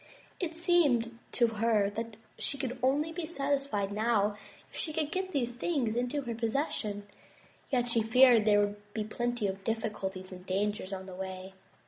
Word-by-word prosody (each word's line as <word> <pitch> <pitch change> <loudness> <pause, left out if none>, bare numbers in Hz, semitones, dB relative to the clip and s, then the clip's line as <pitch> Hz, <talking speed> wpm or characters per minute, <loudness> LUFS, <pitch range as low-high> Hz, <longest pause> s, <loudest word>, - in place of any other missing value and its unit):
It 335 -3 -2
seemed 285 -10 +3
to 240 - +4
her 220 -2 +2
that 225 +1 -5 0.2
she 280 - -1
could 255 -2 -3
only 285 +5 +2
be 325 -1 -4
satisfied 275 -9 -1
now 210 -1 +2 0.4
if - - -13
she 315 - -3
could 305 0 -1
get 375 +1 -2
these 245 -6 -1
things 255 -8 0
into 250 +4 0
her 240 -2 -3
possession, 225 -3 -1 0.6
yet 245 -2 +1
she 235 -1 +2
feared 235 0 +6
there 205 -1 +5
would 205 0 -3
be 215 - 0
plenty 240 +1 -2
of 195 0 -2
difficulties 195 -4 -3
and 180 -1 -9
dangers 195 +1 -1
on 190 -1 -5
the 190 - -9
way. 190 0 -6
230 Hz, 170 wpm, -31 LUFS, 205-270 Hz, 0.6 s, feared